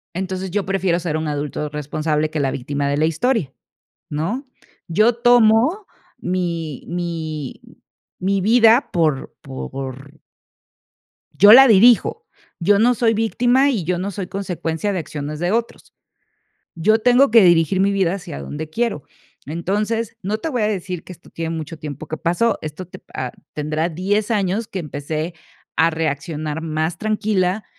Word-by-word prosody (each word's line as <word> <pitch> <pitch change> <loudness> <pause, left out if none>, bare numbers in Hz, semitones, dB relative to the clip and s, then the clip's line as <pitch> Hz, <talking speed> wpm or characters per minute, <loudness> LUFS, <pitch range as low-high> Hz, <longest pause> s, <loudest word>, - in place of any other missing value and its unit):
entonces, 190 0 -3
yo 205 0 0
prefiero 185 -2 0
ser 165 -3 -2
un 155 0 -2
adulto 150 0 -3
responsable 150 +1 -2
que 155 - -3
la 135 -1 0
víctima 140 +2 -2
de 140 - 0
la 155 - +1
historia, 165 - 0 0.6
¿no? 180 - -3 0.4
Yo 215 +7 +3
tomo 240 - +4 0.3
mi 170 - -3
mi 165 -5 -4 0.6
mi 195 +1 +1
vida 230 +4 +4
por 155 -6 0
por 135 +1 -8 1.2
yo 205 +2 +9
la 265 +3 +10
dirijo, 240 - +5 0.4
yo 200 +4 +4
no 240 +4 +4
soy 225 -1 +2
víctima, 245 +5 +2
y 215 -10 -1
yo 175 +1 -1
no 195 +2 -3
soy 185 -1 -5
consecuencia 185 -1 -3
de 185 - -2
acciones 150 -1 -6
de 175 +2 0
otros. 230 +1 -3 0.8
Yo 215 +7 +3
tengo 250 +4 +4
que 230 -1 +7
dirigir 175 +1 +4
mi 200 +1 +3
vida 190 -3 +1
hacia 180 -6 -7
donde 155 +1 -6
quiero. 220 - -2 0.4
Entonces, 210 +8 -2
no 210 +3 -2
te 325 - -4
voy 245 -7 -1
a - - +2
decir 185 -4 -4
que 185 - -10
esto 170 - -16
tiene 165 0 -4
mucho 160 +1 -7
tiempo 145 -3 -7
que 160 - -4
pasó, 175 +9 0
esto 155 +4 -6
te - - -12
pa 130 -1 -6 0.2
tendrá 155 +2 -1
10 200 +6 -1
años 205 0 0
que 190 - -4
empecé 155 +2 -4 0.4
a 165 +1 +4
reaccionar 155 0 -3
más 160 +1 -2
tranquila. 210 -2 0
180 Hz, 155 wpm, -20 LUFS, 155-215 Hz, 1.2 s, la